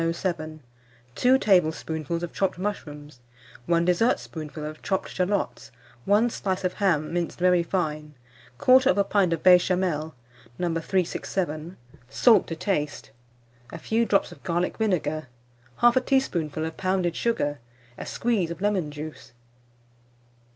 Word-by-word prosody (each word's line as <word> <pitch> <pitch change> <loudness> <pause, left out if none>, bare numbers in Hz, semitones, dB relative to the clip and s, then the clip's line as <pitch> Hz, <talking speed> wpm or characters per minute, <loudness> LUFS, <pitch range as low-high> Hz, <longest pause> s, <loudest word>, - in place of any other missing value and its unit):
107; 165 -2 -3 0.5
2 255 - +4
tablespoonfuls 165 - +1
of 175 - -5
chopped 195 -2 -1
mushrooms, 150 -8 -6 0.5
1 170 0 +2
dessertspoonful 165 - -1
of 155 0 -7
chopped 190 -1 -2
shalots, 190 +2 -2 0.4
1 210 +4 +4
slice 190 -3 -2
of 185 - 0
ham, 170 -7 0
minced 175 -1 -2
very 180 -1 +3
fine; 155 -4 -3 0.4
1/4 230 - +4
pint 195 -4 +2
of 165 -2 -2
Béchamel, 180 -4 +3 0.4
No. 180 - -1
367; 170 -1 -2 0.3
salt 215 - +4
to 165 - -4
taste, 160 -4 -2 0.6
a - - -6
few 225 +7 0
drops 200 - +2
of - - -13
garlic 175 +1 -1
vinegar, 155 -8 -1 0.6
1/2 240 +2 +5
teaspoonful 165 - 0
of 160 0 -6
pounded 185 -3 0
sugar, 145 -12 -1 0.4
a - - -8
squeeze 220 -8 0
of 170 -1 -6
lemon 195 -6 0
juice. 150 -3 -9
175 Hz, 125 wpm, -25 LUFS, 155-195 Hz, 0.6 s, 1/2